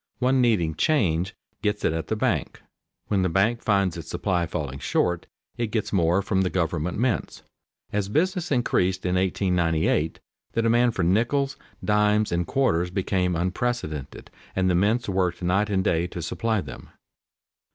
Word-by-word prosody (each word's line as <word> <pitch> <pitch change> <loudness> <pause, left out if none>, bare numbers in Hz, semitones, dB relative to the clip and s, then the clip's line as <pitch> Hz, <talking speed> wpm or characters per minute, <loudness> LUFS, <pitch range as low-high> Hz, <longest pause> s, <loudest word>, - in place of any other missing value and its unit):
One 130 +1 +2
needing 100 -10 +2
"change" 95 - +1 0.3
gets 105 0 -1
it - - +2
at 80 -2 -3
the - - -1
bank; - - -1 0.4
when 100 -2 +1
the 90 - +1
bank 105 +7 +2
finds 100 -4 +1
its 85 -2 -8
supply 85 -1 0
falling 70 -5 -4
short 90 -1 0 0.3
it 120 -1 0
gets 110 -1 -2
more 90 +1 +3
from 95 -1 +1
the 95 - +1
government 85 -2 -1
mints. 120 -1 -1 0.5
As 100 -1 -1
business 175 - 0
increased 95 -8 +1
in 90 - +1
1898, 90 -4 +1 0.3
the 115 - +1
demand 120 +1 +3
for 90 - 0
nickels, 120 +10 +1 0.3
dimes, 105 0 +2
and 85 -1 0
quarters 90 -11 +1
became 90 -1 0
unprecedented, 90 - -3 0.2
and 95 -1 +2
the - - +2
mints 110 +6 +2
worked 95 -2 0
night 95 +4 +1
and 95 -2 +1
day 85 0 +1
to 85 - -6
supply 110 +2 -1
them. 70 -5 -10
95 Hz, 160 wpm, -25 LUFS, 85-110 Hz, 0.5 s, more